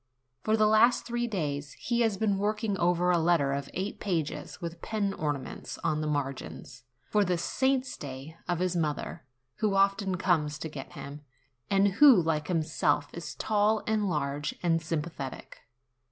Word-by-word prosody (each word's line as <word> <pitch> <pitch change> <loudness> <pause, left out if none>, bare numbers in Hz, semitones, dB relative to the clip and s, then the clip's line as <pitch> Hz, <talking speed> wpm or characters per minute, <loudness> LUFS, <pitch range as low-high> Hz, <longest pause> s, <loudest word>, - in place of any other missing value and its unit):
For 220 +1 +2
the 215 - +4
last 220 +3 +5
three 240 0 -1
days 145 -9 -3
he 240 -1 -2
had 220 -4 +2
been 205 -3 +1
working 210 0 0
over 175 +1 +3
a 175 - +3
letter 160 -5 +3
of 140 0 -3
eight 190 +3 -3
pages, 165 -7 -3
with 170 0 -6
pen 205 -3 -1
ornaments 145 -6 -4
on 155 0 +1
the 155 - -2
margins, 140 -3 -4 0.3
for 210 -1 +4
the 180 -2 +1
saints' 260 +8 0
day 140 +3 -8
of 175 - 0
his 180 +1 0
mother, 155 -4 -2 0.3
who 215 -2 +1
often 195 -1 +2
comes 160 -5 +1
to 160 - -5
get 140 -3 -8
him, 145 +1 -8 0.5
and 195 0 +4
who, 280 -8 +9
like 160 -3 0
himself, 155 -4 +1
is 170 - -6
tall 215 0 +2
and 215 -2 +1
large 145 -2 -2
and 165 -1 +2
sympathetic. 155 -4 -5
175 Hz, 165 wpm, -29 LUFS, 150-210 Hz, 0.5 s, who